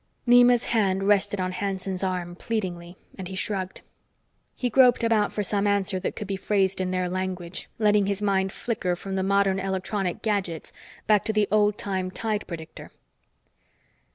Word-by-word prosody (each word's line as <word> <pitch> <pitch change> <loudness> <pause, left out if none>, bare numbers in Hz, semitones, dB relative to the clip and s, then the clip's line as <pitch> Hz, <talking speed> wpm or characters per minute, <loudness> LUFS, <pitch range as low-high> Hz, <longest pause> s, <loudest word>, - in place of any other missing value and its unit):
Nema's 245 0 +6
hand 195 -4 +2
rested 205 0 +2
on 185 0 -1
Hanson's 190 0 -3
arm 180 -2 -2
pleadingly, 180 -4 -4 0.2
and 185 - -5
he 190 - -7
shrugged. 190 -1 -2 0.7
He 250 - -1
groped 245 0 +5
about 220 -3 +2
for 210 - -2
some 205 +1 0
answer 200 -2 0
that 185 - -3
could 210 - -5
be 195 0 -3
phrased 195 -1 0
in 185 - -1
their 185 0 -1
language, 185 -1 -4
letting 210 -2 +3
his 200 -1 -1
mind 195 -2 +1
flicker 195 -7 -2
from 195 +2 -7
the 190 - 0
modern 195 0 +2
electronic 190 -1 -2
gadgets 195 -7 -2 0.3
back 210 -2 +4
to 220 - 0
the 210 -1 +2
old 210 -1 +3
time 190 -2 -2
tide 215 +2 -3
predicter. 165 -2 -8
195 Hz, 165 wpm, -25 LUFS, 185-210 Hz, 0.7 s, Nema's